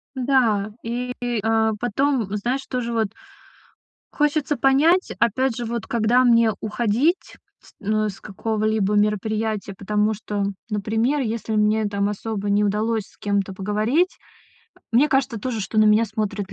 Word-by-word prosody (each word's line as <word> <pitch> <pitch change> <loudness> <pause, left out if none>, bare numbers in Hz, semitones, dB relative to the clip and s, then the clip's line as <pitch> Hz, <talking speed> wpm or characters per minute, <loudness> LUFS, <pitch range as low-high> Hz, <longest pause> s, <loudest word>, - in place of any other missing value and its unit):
Да. 240 -6 +2
И, 245 +2 -3 0.3
а, 220 0 +2
потом, 245 0 0
знаешь, 250 +6 -2
тоже 250 -2 -2
вот 225 -2 +1 1.0
хочется 295 -1 0
понять, 310 +8 +3
опять 255 +2 +1
же, 240 - -4
вот 235 0 -4
когда 235 +2 +3
мне 230 -2 +5
уходить 235 - 0 0.2
с - - -20
ну, 215 +1 0
с 195 - -9
какого-либо 215 0 -1
мероприятия. 210 0 0
Потому 210 +2 0
что, 205 -1 -3 0.3
например, 225 +7 0
если 225 -2 -3
мне 215 +1 +2
там 200 0 -1
особо 205 -1 -4
не 205 +1 +3
удалось 215 +2 0
с - - -24
кем-то 200 -1 -1
поговорить, 215 - 0 0.8
мне 265 +6 +4
кажется 265 -4 +1
тоже, 230 -2 -3
что 210 +3 -2
на 215 - +6
меня 215 +2 +5
смотрят 205 -2 -4
220 Hz, 140 wpm, -22 LUFS, 210-245 Hz, 1.0 s, на